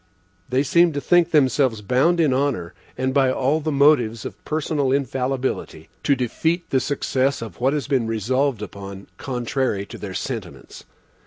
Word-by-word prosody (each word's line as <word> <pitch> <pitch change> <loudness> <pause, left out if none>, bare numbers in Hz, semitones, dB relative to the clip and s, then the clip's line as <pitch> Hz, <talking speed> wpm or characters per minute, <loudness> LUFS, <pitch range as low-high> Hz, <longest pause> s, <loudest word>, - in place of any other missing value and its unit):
They 130 +2 +2
seem 170 +3 +4
to 145 - -2
think 175 +3 +3
themselves 130 -7 +2
bound 135 - +2
in 150 -5 +3
honor, 130 -11 -1 0.2
and 130 +1 -1
by 135 -2 +3
all 135 +4 +1
the 155 0 -2
motives 135 -6 +3
of - - -8
personal 150 -3 -1
infallibility, 135 -1 -2
to 140 - +2
defeat 160 +8 -1
the 130 - +3
success 135 0 0
of 115 -2 -9
what 135 +3 +2
has 150 -2 -1
been 130 -5 +1
resolved 120 +2 0
upon 100 0 -8
contrary 125 -4 -2
to - - -10
their - - -6
sentiments. - - -6
130 Hz, 160 wpm, -22 LUFS, 120-145 Hz, 0.2 s, seem